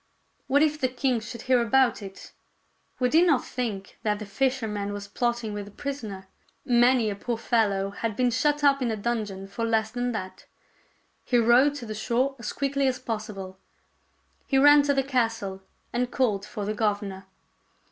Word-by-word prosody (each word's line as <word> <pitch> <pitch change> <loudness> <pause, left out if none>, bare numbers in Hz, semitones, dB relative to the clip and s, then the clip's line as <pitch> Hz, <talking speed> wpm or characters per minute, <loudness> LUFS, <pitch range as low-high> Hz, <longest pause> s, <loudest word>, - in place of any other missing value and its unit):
What 285 +3 +4
if 305 -1 0
the 260 - +3
king 255 -1 0
should 230 +1 -8
hear 255 -2 +3
about 240 0 +3
it! 195 -1 -10 0.7
Would 250 +1 +1
he 325 - +7
not 330 -7 +3
think 215 -6 -5
that 210 -2 0
the 210 - -7
fisherman 210 -2 -1
was 205 0 -6
plotting 240 0 -2
with 205 -1 -5
the - - -11
prisoner? 215 -6 -6 0.4
Many 240 -2 +4
a - - -4
poor 235 +3 -3
fellow 200 -4 +1
had 220 +1 -3
been 250 +1 +2
shut 295 +5 +1
up 275 -1 +4
in 245 - 0
a 220 - -1
dungeon 210 -3 -3
for 215 +4 -5
less 220 -1 +1
than 245 +1 -2
that. 185 -4 -6 0.8
He 245 - +1
rowed 245 +5 +5
to 250 - -7
the 215 - -5
shore 245 +5 0
as 235 - -4
quickly 275 -1 0
as 255 -1 0
possible. 210 -6 -6 0.9
He 270 - +2
ran 290 +2 +7
to 285 - +3
the 270 - +2
castle 225 -7 -1 0.3
and 245 +1 0
called 215 -8 0
for 210 -3 -5
the 210 - -1
governor. 205 -3 -2
235 Hz, 180 wpm, -26 LUFS, 205-260 Hz, 0.9 s, he